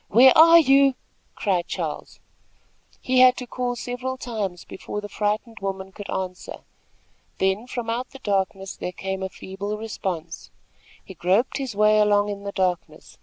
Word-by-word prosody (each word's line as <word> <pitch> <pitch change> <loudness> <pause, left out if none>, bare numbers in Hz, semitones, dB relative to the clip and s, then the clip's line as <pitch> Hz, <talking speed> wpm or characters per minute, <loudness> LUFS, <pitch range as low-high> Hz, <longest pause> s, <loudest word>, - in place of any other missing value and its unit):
where 250 +4 +7
are 330 +1 +9
you?" 275 -3 +5 0.4
cried 180 -5 0
Charles. - - -5 0.8
He 255 0 +2
had 255 0 +7
to 250 - -5
call 245 0 -3
several 250 +2 -4
times 205 -8 -4
before 210 - -6
the 205 - -6
frightened 215 +3 -2
woman 190 -1 -5
could 200 0 -10
answer. 185 -1 -5 0.8
Then 190 +5 0
from 240 -2 -5
out 240 +3 -2
the 270 - -12
darkness 195 -4 -2
there 180 - -5
came 190 0 -4
a 190 - -3
feeble 200 +3 -6
response. 185 -6 -5 0.6
He 190 - -10
groped 190 +10 +1
his 260 -6 -4
way 210 +1 +4
along 205 0 +3
in 200 0 -6
the 200 - -3
darkness. 185 -3 -3
210 Hz, 160 wpm, -24 LUFS, 190-245 Hz, 0.8 s, are